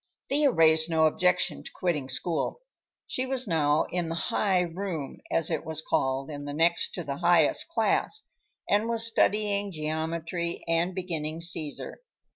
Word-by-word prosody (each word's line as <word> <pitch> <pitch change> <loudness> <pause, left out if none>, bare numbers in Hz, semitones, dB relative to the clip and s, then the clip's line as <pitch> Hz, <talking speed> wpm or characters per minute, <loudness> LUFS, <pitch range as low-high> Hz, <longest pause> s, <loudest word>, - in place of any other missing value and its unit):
Thea 285 +1 +3
raised 160 -5 +4
no 160 -1 +3
objection 180 +3 +2
to - - -9
quitting 150 -7 -1
school. 165 - -2 0.4
She 255 +1 -2
was 260 -1 0
now 155 -3 +2
in 175 -2 -1
the 165 - -2
"high 185 +1 +1
room," 175 -4 -4
as 165 0 0
it 160 - -1
was 160 -1 -3
called, 135 +2 -1
in 145 -1 -6
next 165 +4 +2
to 175 - -4
the 140 -2 -4
highest 175 - +3
class, 415 +5 0 0.4
and 210 +3 +2
was 230 -1 +1
studying 205 -2 +1
geometry 165 +2 -3
and 170 +2 +1
beginning 165 -4 -3
Caesar. 165 - -2
165 Hz, 150 wpm, -27 LUFS, 155-190 Hz, 0.4 s, raised